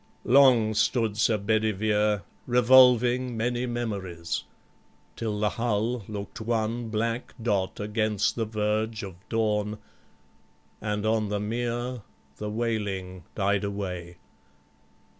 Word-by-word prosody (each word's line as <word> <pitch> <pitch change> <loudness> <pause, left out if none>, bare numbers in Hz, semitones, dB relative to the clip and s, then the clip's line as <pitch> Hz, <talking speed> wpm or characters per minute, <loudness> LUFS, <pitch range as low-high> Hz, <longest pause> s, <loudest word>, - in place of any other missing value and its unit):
Long 125 -5 +5
stood 110 0 +1
Sir 110 0 +2
Bedivere 105 -1 +1 0.2
Revolving 125 0 +5
many 120 +2 -1
memories, 100 -8 -3 0.7
till 105 -2 -3
the 105 0 +2
hull 115 0 -1
Look'd 100 -2 -6
one 115 +1 -1
black 115 +2 -2
dot 100 -5 -1
against 105 -1 0
the 115 - -1
verge 110 0 -1
of 95 -2 -6 0.2
dawn, 105 -2 0 1.0
And 105 0 -2
on 110 -1 +1
the 105 0 -1
mere 120 +3 -2 0.4
the 105 - -4
wailing 100 -6 -3
died 100 0 +1
away. 90 -4 -4
110 Hz, 105 wpm, -27 LUFS, 105-115 Hz, 1.0 s, Long